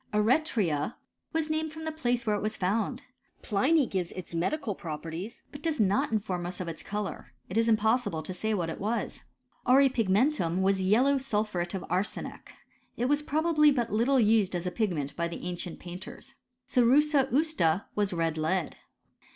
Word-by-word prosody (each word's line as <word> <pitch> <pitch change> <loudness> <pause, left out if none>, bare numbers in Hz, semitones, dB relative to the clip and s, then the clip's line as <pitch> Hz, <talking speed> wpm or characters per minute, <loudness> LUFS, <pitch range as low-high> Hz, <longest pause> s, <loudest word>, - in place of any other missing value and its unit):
Eretria 210 - +1 0.4
was 320 -1 0
named 315 0 -1
from 320 +1 -8
the 315 - -1
place 245 -6 -1
where 210 -1 +2
it 205 - -2
was 215 +1 -2
found. 220 +8 -1 0.4
Pliny 270 +9 +3
gives 185 -6 -2
its 185 -2 -8
medical 210 - -1
properties, 165 +6 -6
but 285 - -9
does 320 -2 -1
not 205 0 +2
inform 190 -5 -1
us 180 - -6
of 180 - -4
its 165 -1 -5
colour. 205 -11 -5 0.2
It 185 - -6
is 230 +1 +3
impossible 220 -6 +2
to 185 - -5
say 220 +4 -1
what 170 -4 -1
it - - -7
was. 220 +4 -2 0.5
Auripigmentttm 240 - +3
was 195 0 +2
yellow 245 +9 +4
sulphuret 210 -8 -1
of 190 - -4
arsenic. 185 +4 -3 0.5
It 240 - 0
was 290 +3 +2
probably 300 0 +3
but 240 -5 -1
little 250 +5 +3
used 215 -4 +3
as 175 0 -3
a 180 - -1
pigment 170 -10 -2
by 170 0 -1
the 170 +1 -7
ancient 175 -1 -4
painters. 190 +10 -9 0.3
Cerussa 275 +2 +4
usta 265 - +2
was 205 -2 0
red 165 -2 -1
lead. 160 +2 -1
215 Hz, 170 wpm, -29 LUFS, 180-265 Hz, 0.5 s, yellow